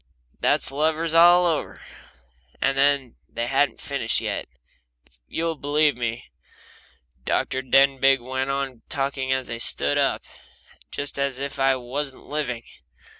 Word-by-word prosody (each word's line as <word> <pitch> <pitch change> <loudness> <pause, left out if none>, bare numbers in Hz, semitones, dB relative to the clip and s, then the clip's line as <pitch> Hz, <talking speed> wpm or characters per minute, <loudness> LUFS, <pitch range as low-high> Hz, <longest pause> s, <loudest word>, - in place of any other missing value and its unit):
That's - - +2
lovers 160 +3 0
all 175 +2 +7
over. 165 -3 -1 0.8
And 135 -2 +2 0.2
they 115 - -3
hadn't 135 +3 +1
finished 140 -7 -1
yet, - - -3 0.6
if - - -28
you'll 165 0 -2
believe 145 0 +2
me. 120 -1 -4 1.0
Dr. 130 - -1
Denbigh 135 +1 +4
went 130 +2 -3
on 135 -3 -3
talking 135 -2 -2
as 130 -1 0
they 115 -1 -5
stood 70 -10 +1
up, - - +1 0.7
just 140 0 -5
as 140 -2 -1
if 140 0 -5
I 135 0 +3
wasn't 130 +2 -5
living. 125 -6 -3
135 Hz, 125 wpm, -24 LUFS, 130-145 Hz, 1.0 s, all